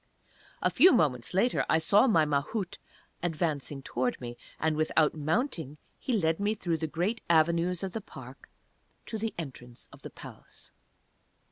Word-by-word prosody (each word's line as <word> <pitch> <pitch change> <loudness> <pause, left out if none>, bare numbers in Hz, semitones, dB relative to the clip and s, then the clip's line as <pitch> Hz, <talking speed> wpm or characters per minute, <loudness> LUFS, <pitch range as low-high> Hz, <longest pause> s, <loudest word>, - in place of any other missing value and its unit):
A - - +3
few 370 - +7
moments 130 - +1
later 195 +7 +2
I - - +5
saw 200 +9 +4
my 165 -10 +4
Mahout 150 +7 -2 0.4
advancing 150 -4 -2
towards 125 0 -1
me, 120 -1 -7 0.2
and, 160 -1 +1
without 155 0 +2
mounting, 160 - -2 0.2
he 255 - -2
led 165 -6 +1
me 205 +2 0
through 170 -5 -1
the 160 - -2
great 180 +9 -1
avenues 170 +2 +3
of 190 - -3
the 225 - -3
park 135 -7 -12 0.6
to 220 - -5
the 225 +1 -3
Entrance 125 -6 -8
of - - -14
the - - -8
Palace. - - -12
160 Hz, 155 wpm, -29 LUFS, 145-200 Hz, 0.6 s, few